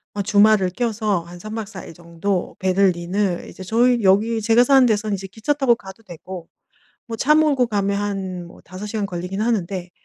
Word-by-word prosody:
어 205 - -1
주말을 205 -1 +4
껴서 215 -2 -1
한 175 +1 -12
3 215 +4 -7
박 225 -1 -3
4 195 -3 -9
일 - - -11
정도 170 +3 -3
베를린을 185 0 0
이제 190 - -10
저희 235 +4 +2
여기 215 +4 +3
제가 230 +3 +4
사는 265 0 +5
데선 215 -2 0
이제 195 -1 -4
기차 220 +8 -2
타고 270 -4 +3
가도 195 0 -13
되고 175 -1 -9 0.6
뭐 230 -2 -5
차 300 +6 +4
몰고 295 -5 +3
가면 200 -2 -1
한 190 -3 -4
뭐 170 - -15
5 185 +4 -8
시간 210 0 -3
걸리긴 185 +1 -4
하는데 190 -5 -2
200 Hz, 315 characters per minute, -21 LUFS, 185-225 Hz, 0.6 s, 사는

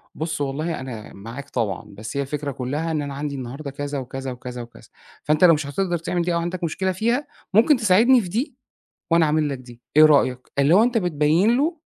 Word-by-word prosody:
بُصّ 160 -1 -3
والله 150 +4 -2
أنا 120 -5 -8
معاك 115 +7 -9
طبعًا، 110 -6 -2
بس 110 +6 -6
هي - - +1
الفكرة 145 +1 -3
كلّها 145 +6 -3
إن 155 -2 -1
أنا 140 -1 -5
عندي 140 +1 -4
النهارده 135 +3 -6
كذا 145 0 -4
وكذا، 135 +1 -5
وكذا، 125 0 -7
وكذا 120 0 -13 0.3
فأنت 150 +3 +2
لو 175 -2 +8
مش 150 -1 -1
هاتقدر 175 +4 -1
تعمل 175 +2 -2
دي 175 0 0
أو 170 - +1
عندك 175 +1 -4
مشكلة 185 +3 -1
فيها 235 +9 0 0.3
ممكن 235 +8 +5
تساعدني 230 +4 +5
في 185 - -6
دي، 235 - -2 0.6
وأنا 165 -1 +5
أعمل 150 0 +1
لك 140 - -3
دي، 120 -2 -14 0.2
إيه 155 - +10
رأيك؟ 130 -4 +2
اللي 140 +4 +4
هو 210 - +6
أنت 240 0 +1
بتبيّن 175 +4 +2
له 320 +5 0
150 Hz, 210 wpm, -23 LUFS, 135-180 Hz, 0.6 s, إيه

